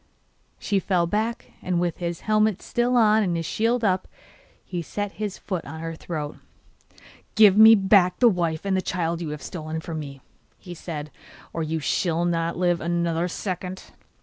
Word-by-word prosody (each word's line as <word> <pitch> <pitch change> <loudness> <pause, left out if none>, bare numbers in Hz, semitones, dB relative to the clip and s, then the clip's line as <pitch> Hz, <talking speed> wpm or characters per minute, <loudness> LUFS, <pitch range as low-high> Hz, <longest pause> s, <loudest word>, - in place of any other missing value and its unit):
She 200 -2 0
fell 180 -2 +1
back, 220 +6 -2
and 180 -1 -1
with 175 -2 -1
his 170 -1 -4
helmet 215 -2 +2
still 245 +1 +1
on 220 -1 +5
and 175 -5 0
his 165 - -3
shield 230 +5 0
up, 185 -3 +1 0.6
he 175 -2 -4
set 205 +5 -4
his 210 -2 -5
foot 185 -5 -4
on 160 +3 -8
her 165 0 -5
throat. 155 -2 -5 1.0
'Give 210 -3 +7
me 220 +1 +9
back 195 -3 +4
the 245 - +5
wife 170 -5 0
and 195 -1 +1
the 185 - +1
child 170 -2 -2
you 165 - -4
have 150 0 -6
stolen 160 -2 -5
from 160 0 -5
me,' 140 -2 -8 0.4
he 180 - -10
said, 155 -3 -7 0.4
'or 165 - -3
you 160 0 -2
shall 170 +2 0
not 170 -1 -1
live 175 -1 +1
another 170 0 0
second! 185 +1 -5
175 Hz, 175 wpm, -24 LUFS, 165-205 Hz, 1.0 s, me